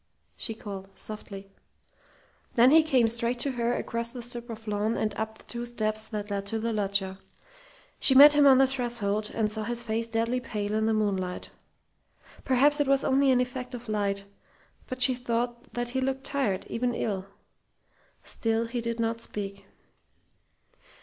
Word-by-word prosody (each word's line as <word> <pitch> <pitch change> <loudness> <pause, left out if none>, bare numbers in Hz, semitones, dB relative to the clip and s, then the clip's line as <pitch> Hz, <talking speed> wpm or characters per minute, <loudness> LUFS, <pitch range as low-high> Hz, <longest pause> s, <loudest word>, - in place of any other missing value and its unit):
she 225 - -3
called, 195 -3 -8
softly. 195 -2 -9 1.0
Then 245 +2 +6
he 320 +1 +8
came 265 -7 +3
straight 235 +2 0
to 280 - -1
her 240 -1 0
across 235 0 -3
the 245 0 -8
strip 240 0 -6
of 225 -1 -8
lawn 210 +2 0
and 215 - -1
up 220 0 -4
the - - -18
two 240 0 -5
steps 215 -2 -2
that 210 -2 -5
led 200 0 -3
to 225 - -2
the 230 +1 -2
loggia. 195 -2 -1 0.8
She 265 - +5
met 290 +2 +10
him 290 -1 +6
on 265 -1 +8
the 270 - +6
threshold 235 -5 -1
and 215 -2 0
saw 215 0 -2
his 240 +2 -3
face 230 0 -2
deadly 230 +2 0
pale 210 -4 -4
in 220 0 +1
the 225 - +2
moonlight. 190 -4 -2 0.9
Perhaps 285 +3 +4
it 290 - +2
was 275 0 +3
only 275 +1 +3
an 250 -1 +4
effect 250 0 -4
of 245 0 -9
light, 200 -2 -1 0.6
but 255 0 +2
she 255 - +4
thought 240 0 -3
that 240 0 -2
he 260 +2 -2
looked 265 +1 -1
tired, 245 -10 0
even 245 +1 -1
ill. 195 -4 -2 1.0
Still 225 0 -1
he 235 +1 -3
did 230 0 -3
not 230 0 -1
speak. 200 -2 -5
230 Hz, 175 wpm, -28 LUFS, 210-250 Hz, 1.0 s, met